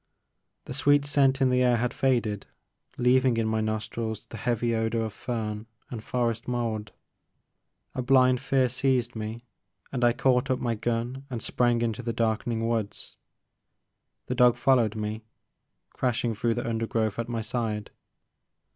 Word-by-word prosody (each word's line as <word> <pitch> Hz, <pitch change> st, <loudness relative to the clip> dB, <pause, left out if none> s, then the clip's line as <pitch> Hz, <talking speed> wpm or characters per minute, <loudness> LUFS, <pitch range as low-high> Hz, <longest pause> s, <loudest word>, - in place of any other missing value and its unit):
The -, -, -6 dB
sweet 145 Hz, +1 st, +3 dB
scent 140 Hz, -1 st, +2 dB
in 130 Hz, -1 st, +4 dB
the 125 Hz, 0 st, +3 dB
air 125 Hz, -1 st, +4 dB
had 125 Hz, +2 st, -1 dB
faded, 115 Hz, -6 st, 0 dB, 0.5 s
leaving 125 Hz, 0 st, +3 dB
in 115 Hz, -1 st, +1 dB
my 110 Hz, 0 st, 0 dB
nostrils 110 Hz, 0 st, -3 dB
the -, -, -9 dB
heavy 120 Hz, -2 st, 0 dB
odor 110 Hz, 0 st, 0 dB
of 110 Hz, -, -6 dB
fern 110 Hz, -2 st, -4 dB, 0.2 s
and 115 Hz, -3 st, -6 dB
forest 115 Hz, -2 st, -1 dB
mould. 115 Hz, -3 st, -2 dB, 1.0 s
A 130 Hz, -, -2 dB
blind 130 Hz, 0 st, +4 dB
fear 135 Hz, -1 st, +2 dB
seized 125 Hz, -1 st, 0 dB
me, 110 Hz, +2 st, -5 dB, 0.5 s
and 125 Hz, -2 st, -2 dB
I 120 Hz, -1 st, +5 dB
caught 125 Hz, +1 st, +2 dB
up 130 Hz, -, +2 dB
my 120 Hz, -2 st, -1 dB
gun 120 Hz, +3 st, -2 dB
and 135 Hz, -, -12 dB
and 120 Hz, -3 st, -4 dB
sprang 120 Hz, -1 st, +1 dB
into 115 Hz, 0 st, -1 dB
the 115 Hz, -1 st, -3 dB
darkening 115 Hz, 0 st, 0 dB
woods. 115 Hz, -3 st, -3 dB, 1.1 s
The -, -, -2 dB
dog 125 Hz, -1 st, +5 dB
followed 120 Hz, -4 st, +3 dB
me, 110 Hz, +1 st, -4 dB, 0.7 s
crashing 120 Hz, -2 st, 0 dB
through 115 Hz, +2 st, 0 dB
the 120 Hz, -, -3 dB
under 115 Hz, -1 st, -1 dB
growth 110 Hz, -1 st, -1 dB
at 115 Hz, +1 st, -3 dB
my 115 Hz, -1 st, -2 dB
side. 110 Hz, -2 st, -3 dB
120 Hz, 160 wpm, -27 LUFS, 110-125 Hz, 1.1 s, I